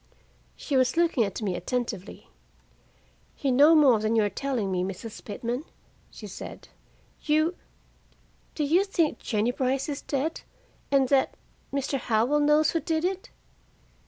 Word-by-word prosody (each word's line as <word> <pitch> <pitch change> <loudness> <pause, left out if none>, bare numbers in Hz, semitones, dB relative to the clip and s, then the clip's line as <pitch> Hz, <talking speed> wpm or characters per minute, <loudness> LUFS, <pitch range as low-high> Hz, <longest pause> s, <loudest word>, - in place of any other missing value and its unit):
She 285 - -3
was 255 +4 +2
looking 335 -8 +3
at 200 +2 -5
me 190 -3 -1
attentively. 225 -2 -4 1.1
"You 275 -3 0
know 290 +6 +6
more 270 -7 +6
than 215 +2 0
you 220 - +4
are 205 - 0
telling 250 -8 -2
me, 180 -1 0
Mrs. 195 +4 -7
Pitman," 235 +5 -4 0.5
she - - -11
said. - - -9 0.5
"You 310 +3 +2 1.0
do 305 - -1
you 330 +7 +3
think 340 -6 0
Jennie 220 +1 0
Brice 260 +1 -1
is 285 -1 -4
dead, 290 +3 -2 0.5
and 270 -2 +3
that 275 -2 +2 0.3
Mr. 275 0 -1
Howell 240 +6 +1
knows 300 +1 +4
who 330 - 0
did 320 0 -1
it?" 380 +1 -3
270 Hz, 145 wpm, -27 LUFS, 225-300 Hz, 1.1 s, know